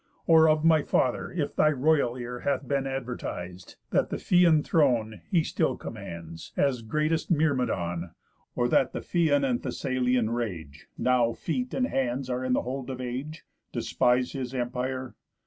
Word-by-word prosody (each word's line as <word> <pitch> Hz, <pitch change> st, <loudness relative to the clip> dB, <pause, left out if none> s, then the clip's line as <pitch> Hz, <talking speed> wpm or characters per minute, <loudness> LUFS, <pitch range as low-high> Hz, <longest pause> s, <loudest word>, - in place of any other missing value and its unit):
Or 160 Hz, -1 st, +6 dB
of 155 Hz, 0 st, +2 dB
my 160 Hz, -2 st, +5 dB
father 125 Hz, -3 st, 0 dB
if 160 Hz, -5 st, -3 dB
thy 155 Hz, -, +4 dB
royal 140 Hz, -3 st, +2 dB
ear 125 Hz, 0 st, -5 dB
Hath 140 Hz, 0 st, -1 dB
been 140 Hz, 0 st, 0 dB
advertis'd, 115 Hz, -9 st, -5 dB, 0.2 s
that -, -, +2 dB
the -, -, -2 dB
Phthian 170 Hz, -4 st, +4 dB
throne 115 Hz, -, +1 dB
He 170 Hz, -4 st, +3 dB
still -, -, 0 dB
commands, 85 Hz, -1 st, -8 dB
as 135 Hz, -4 st, +1 dB
greatest 155 Hz, +8 st, -1 dB
Myrmidon? 125 Hz, -, 0 dB, 0.5 s
Or 120 Hz, -, +1 dB
that 130 Hz, -, +2 dB
the -, -, -4 dB
Phthian 145 Hz, -5 st, +2 dB
and 125 Hz, -2 st, 0 dB
Thessalian 125 Hz, -2 st, 0 dB
rage 90 Hz, -9 st, -5 dB
(Now 125 Hz, -2 st, +2 dB
feet 250 Hz, -, -3 dB
and 255 Hz, -, +2 dB
hands 130 Hz, -, -1 dB
are 125 Hz, +1 st, -2 dB
in 130 Hz, 0 st, 0 dB
the -, -, +1 dB
hold 130 Hz, +1 st, -5 dB
of 130 Hz, -1 st, -5 dB
age) 130 Hz, +6 st, -5 dB, 0.3 s
Despise 125 Hz, 0 st, +1 dB
his 130 Hz, -1 st, -5 dB
empire? 130 Hz, +1 st, -3 dB
130 Hz, 160 wpm, -27 LUFS, 120-150 Hz, 0.5 s, Or